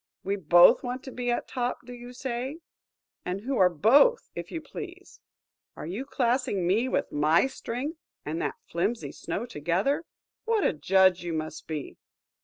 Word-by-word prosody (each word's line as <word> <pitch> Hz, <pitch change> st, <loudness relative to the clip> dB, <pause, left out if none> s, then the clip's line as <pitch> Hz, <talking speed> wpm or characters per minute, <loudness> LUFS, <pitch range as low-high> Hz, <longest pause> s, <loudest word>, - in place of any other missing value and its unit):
We 200 Hz, +1 st, 0 dB
both 175 Hz, -2 st, +6 dB
want 250 Hz, +1 st, -4 dB
to 265 Hz, -, -8 dB
be 245 Hz, 0 st, -3 dB
at 240 Hz, -, -1 dB
top, 245 Hz, -1 st, -3 dB
do 245 Hz, -, -9 dB
you 245 Hz, 0 st, -10 dB
say? 255 Hz, +2 st, -4 dB, 0.7 s
And 185 Hz, +2 st, -3 dB
who 260 Hz, +3 st, -2 dB
are 185 Hz, -1 st, +6 dB
both, 255 Hz, -, +4 dB
if -, -, -6 dB
you 330 Hz, -, -3 dB
please? 355 Hz, +5 st, -10 dB, 0.6 s
Are -, -, -7 dB
you 200 Hz, -, -4 dB
classing 245 Hz, -7 st, 0 dB
me, 220 Hz, +8 st, +2 dB
with -, -, -1 dB
my 155 Hz, -, +3 dB
strength, 270 Hz, +4 st, -5 dB, 0.3 s
and 160 Hz, +3 st, -3 dB
that -, -, -2 dB
flimsy 215 Hz, +8 st, -2 dB
snow 225 Hz, -, -4 dB
together? 190 Hz, -, -1 dB, 0.4 s
What 450 Hz, -2 st, +1 dB
a -, -, +2 dB
judge 185 Hz, +3 st, +4 dB
you 175 Hz, -1 st, -4 dB
must 155 Hz, -1 st, -5 dB
be!" 155 Hz, -3 st, -5 dB
235 Hz, 170 wpm, -27 LUFS, 175-265 Hz, 0.7 s, both